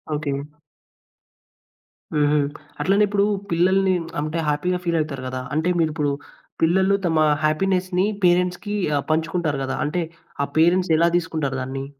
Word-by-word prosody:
Okay. 145 -2 -2 1.8
హుహు. 150 0 +3 0.4
అట్లనే 200 +2 +3
ఇప్పుడు 200 0 +2 0.3
పిల్లల్ని 185 +2 +3 0.3
అంటే 155 +2 -2
హ్యాపీ‌గా 180 +5 0
ఫీలవుతారు 155 -6 -1
గదా! 130 0 -4
అంటే 160 +4 +1
మీరిప్పుడు, 150 -3 0 0.5
పిల్లలు 190 +4 +3
తమ 160 -2 +1 0.3
హ్యాపీనెస్‌ని 185 +3 +1 0.2
పేరెంట్స్‌కి 180 +4 +1 0.2
ఆహ్, 140 - -3
పంచుకుంటారు 160 -2 0
గదా! 135 - -3
అంటే 170 +3 -1 0.4
ఆ - - +1
పేరెంట్స్ 175 +2 +3
ఎలా 170 +1 +4
దీసుకుంటారు 155 -6 -2
దాన్ని? 135 +1 -4
165 Hz, 120 wpm, -22 LUFS, 150-180 Hz, 1.8 s, ఎలా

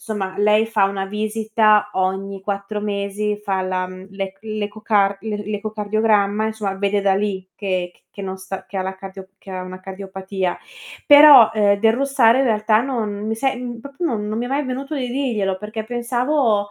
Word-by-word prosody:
somma 195 -4 -4
lei 210 +1 +4
fa 220 -3 +2
1 195 0 -2
visita 215 0 +1
ogni 190 +1 -2
4 200 +1 -4
mesi, 205 0 -2
fa 195 -2 -1
la 185 0 -1
mhmm, 185 +1 -10
l'ec 195 -1 -6
l'ecocar 210 -2 0
l 215 -1 -4 0.2
l'ecocardiogramma, 210 0 0
insomma, 215 -3 -3
vede 200 +1 0
da 195 -1 +2
lì 195 -2 -2
che 185 -3 -2
c - - -30 0.2
che - - -4
non 190 0 -4
sta 190 0 -7
che 200 - -8
ha 190 - 0
la 190 0 -5
cardio 190 0 -10
che 195 - -13
ha 185 0 -4
una 185 0 -8
cardiopatia. 190 -1 -4 0.5
Però, 290 -6 +9
ehm, 205 -2 +3
del 225 +1 +4
russare 260 -2 +3
in - - +2
realtà 215 -2 +2
non 215 -6 -3
mi 220 - -1
se 265 +3 0
mhmm, 240 -1 -6
proprio 280 +7 -5
non 215 -7 -2
non 215 +1 -2
mi 240 - -2
è - - -6
mai 280 +3 -1
venuto 270 +3 -4
di 255 -2 -2
dirglielo, 225 -8 -1
perché 215 +2 -6
pensavo 240 -2 0
210 Hz, 190 wpm, -20 LUFS, 195-225 Hz, 0.5 s, Però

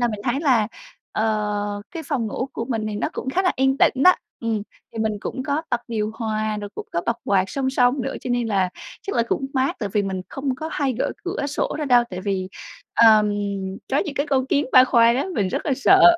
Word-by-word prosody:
là 240 - +3
mình 210 -2 -4
thấy 265 +3 0
là, 240 -8 +3 0.4
ờ, 210 -1 -1
cái 330 -2 -6
phòng 275 -6 -1
ngủ 255 +5 -3
của 230 - -3
mình 225 -4 -2
thì 210 - -4
nó 210 - -1
cũng 265 - -4
khá 375 +7 +1
là 365 - +2
yên 265 +1 +2
tĩnh 265 - +3
đó. 365 - +8 0.3
Ừm, 220 -3 -1 0.3
thì 225 - -7
mình 220 -1 +1
cũng 260 +4 -4
có 290 +3 -1
bật 240 -1 +1
điều 215 -2 -1
hòa, 215 -1 -2
rồi 205 - -6
cũng - - -6
có 170 - +1
bật 235 0 +1
quạt 195 -2 +3
song 265 -1 -1
song 250 0 +2
nữa, - - -3
cho 250 - -5
nên 245 -1 +1
là 190 -3 +2 0.3
chắc 400 - -3
là 235 - +4
cũng 270 - 0
mát 265 +1 +1
tại 205 - -2
vì 210 - +2
mình 190 -1 -3
không 270 -1 -2
có 315 +4 -5
hay 275 -3 0
gỡ - - 0
cửa 355 -6 -2
sổ 290 - -2
ra 300 - -1
đâu, 245 -3 +5
tại 180 - -5
vì, 190 -1 -2 0.5
ờm, 215 -2 +6 0.6
có 275 - +2
những 295 - -2
cái 285 +1 0
con 265 -2 +1
kiến 285 0 +1
ba 255 0 +9
khoang 235 -1 +4
á, 275 - 0
mình 195 -3 +1
rất - - -3
là 280 - +2
sợ. 375 +8 +5
240 Hz, 250 wpm, -23 LUFS, 215-275 Hz, 0.6 s, ba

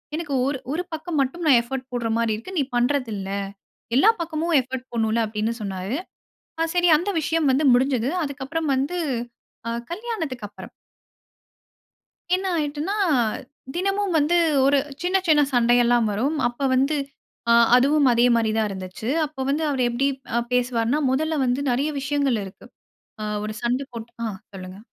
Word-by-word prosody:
எனக்கு 310 -3 -4
ஒரு 280 0 -1
ஒரு 335 +4 -1
பக்கம் 320 +1 -4
மட்டும் 275 +6 -2
நான் 280 -5 +6
எஃபோர்ட் 260 +2 -6
போடுற 240 -2 -2
மாரி 230 -1 +1
இருக்கு. 230 - -9
நீ 290 - +3
பண்றதில்ல. 240 -6 0 0.6
எல்லா 335 - +6
பக்கமும் 330 0 -1
எஃபோர்ட் 255 0 -7
போடணும்ல" 225 0 +1
அப்டீன்னு 215 +2 -2
சொன்னாரு. 195 +4 -3 0.6
ஆ - - +4
சரி 355 0 +3
அந்த 360 +6 -2
விஷயம் 320 0 +1
வந்து 280 +4 +1
முடிஞ்சது. 255 0 +2
அதுக்கப்பறம் 285 +2 -3
வந்து, 280 +7 -1 0.7
ஆ - - -1 0.2
கல்யாணத்துக்கப்பறம். 325 - -5 1.6
என்ன 380 +1 -3
ஆயிட்டுன்னா, 300 +4 -2 0.8
தினமும் 390 +1 0
வந்து 305 +3 +2 0.3
ஒரு 280 +1 +4 0.3
சின்ன 365 +2 +2
சின்ன 305 -2 +5
சண்டை 240 0 +4
எல்லாம் 240 -1 +3
வரும். 255 +10 0
அப்போ 240 +3 -3
வந்து, 275 +4 +2 0.5
ஆ - - +6 0.2
அதுவும் 280 +1 +4
அதே 235 +1 +4
மாரி 225 -2 +1
தான் 220 -1 +2
இருந்துச்சு. 190 +2 -7 0.2
அப்போ 295 -2 -8
வந்து 295 +3 0
அவர் 265 -3 +1
எப்படி 245 +4 0 0.3
அ - - +3
பேசுவார்னா, 245 +2 +1
முதல்ல 310 +3 0
வந்து 250 +2 0
நெறைய 270 +5 0
விஷயங்கள் 275 -4 0
இருக்கு. 190 -1 -12 0.6
ஆ - - -2 0.2
ஒரு 215 0 -4
சண்ட 245 +3 0
போட்டு 235 0 -8
ஆ. - - -1 0.3
சொல்லுங்க. 185 0 -9
265 Hz, 150 wpm, -23 LUFS, 235-310 Hz, 1.6 s, நான்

